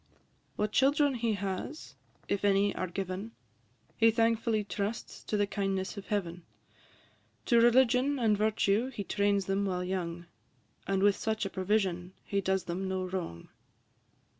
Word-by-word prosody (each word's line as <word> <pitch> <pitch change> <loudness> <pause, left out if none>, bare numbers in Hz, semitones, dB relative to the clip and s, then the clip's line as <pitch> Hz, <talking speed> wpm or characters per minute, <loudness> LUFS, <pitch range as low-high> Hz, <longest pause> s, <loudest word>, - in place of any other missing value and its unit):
What 210 0 -1
children 285 +3 +3
he 235 -2 0
has, 200 - -5 0.3
if 200 - -1
any 200 0 +3
are 185 - -2
given, 195 +4 -5 0.6
He 225 0 +5
thankfully 225 -1 +1
trusts 205 +2 -4
to 210 - -1
the 205 - +3
kindness 195 -1 -2
of 200 - -8
Heaven; 180 -4 -2 1.0
To 235 -2 +4
religion 255 +3 +4
and 225 -4 +3
virtue 215 +2 +1
he 225 -6 -5
trains 200 0 +1
them 195 +1 0
while 180 -2 -1
young, 175 -2 -3 0.6
And 195 0 +1
with 205 -1 +4
such 220 -1 -1
a 195 - -4
provision 185 -2 -1
he 200 0 -1
does 190 -1 0
them 185 +2 -3
no 190 0 -2
wrong. 180 - -5
200 Hz, 145 wpm, -30 LUFS, 190-225 Hz, 1.0 s, He